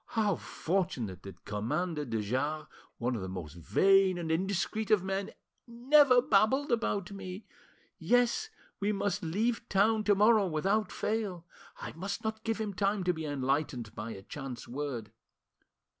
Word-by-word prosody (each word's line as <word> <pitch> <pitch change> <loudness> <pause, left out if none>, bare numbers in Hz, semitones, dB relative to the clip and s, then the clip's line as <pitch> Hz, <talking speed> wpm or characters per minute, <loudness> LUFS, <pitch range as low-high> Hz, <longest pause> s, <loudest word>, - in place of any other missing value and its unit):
How 210 -4 +3
fortunate 155 - -2
that 100 - -12
Commander 150 - -2
de 115 -3 -2
Jars, 145 +8 -1 0.3
one 125 +1 -1
of 110 - -4
the 95 - -5
most 90 -5 -6
vain 190 - +3
and 165 -2 -3
indiscreet 195 +5 -1
of 205 -4 +4
men, 195 +1 -2 0.4
never 250 +1 +5
babbled 260 +6 +3
about 205 -5 0
me! 195 +1 -7 0.5
Yes, 245 - +2 0.3
we 205 +1 +1
must 200 -2 -1
leave 225 +8 -1
town 215 +3 +3
to 205 - +5
morrow 210 0 +5
without 195 +7 0
fail. 205 -6 -2 0.3
I - - -6
must 190 +5 -4
not 220 0 -3
give 225 -1 -1
him 210 -2 -2
time 200 +1 0
to 180 0 +2
be 160 -1 -5
enlightened 135 -5 -1
by 115 +1 -5
a 95 - -10
chance 135 0 -7
word. 125 -5 -4
190 Hz, 155 wpm, -31 LUFS, 135-215 Hz, 0.5 s, never